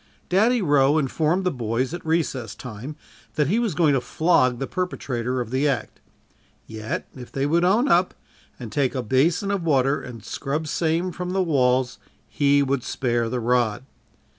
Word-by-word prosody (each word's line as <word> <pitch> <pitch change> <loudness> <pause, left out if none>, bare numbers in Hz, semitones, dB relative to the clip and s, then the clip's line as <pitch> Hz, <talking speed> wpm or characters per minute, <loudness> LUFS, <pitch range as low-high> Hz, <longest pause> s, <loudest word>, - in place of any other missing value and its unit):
"Daddy" 220 +5 +3
Roe 145 -2 +4
informed 155 +5 +1
the 180 - +1
boys 125 +3 -2
at 175 - -6
recess 160 -7 -1
time 125 +5 -8 0.4
that 150 - +2
he 215 +6 +2
was 225 -9 -1
going 155 -2 +3
to 135 - +1
flog 130 -4 +2
the 135 - -3
perpetrator 130 -8 -3
of 120 -2 -4
the 135 +3 +1
act 140 - -2 0.7
yet, 110 0 -5
if 125 -2 -10
they 135 0 -1
would 165 +4 +2
own 215 +9 +3
up, 180 -5 +3 0.4
and 120 -4 -7
take 140 -1 0
a 130 - -1
basin 160 - +1
of 200 -2 -1
water 140 -3 +2
and 115 -3 -10
scrub 150 +3 -3
same 165 +4 0
from 180 +1 -5
the 190 0 +2
walls, 130 -5 +1 0.3
he 140 0 +3
would 135 -1 0
spare 120 -2 -1
the 125 +1 -2
rod. 120 -1 0
140 Hz, 175 wpm, -23 LUFS, 125-170 Hz, 0.7 s, Roe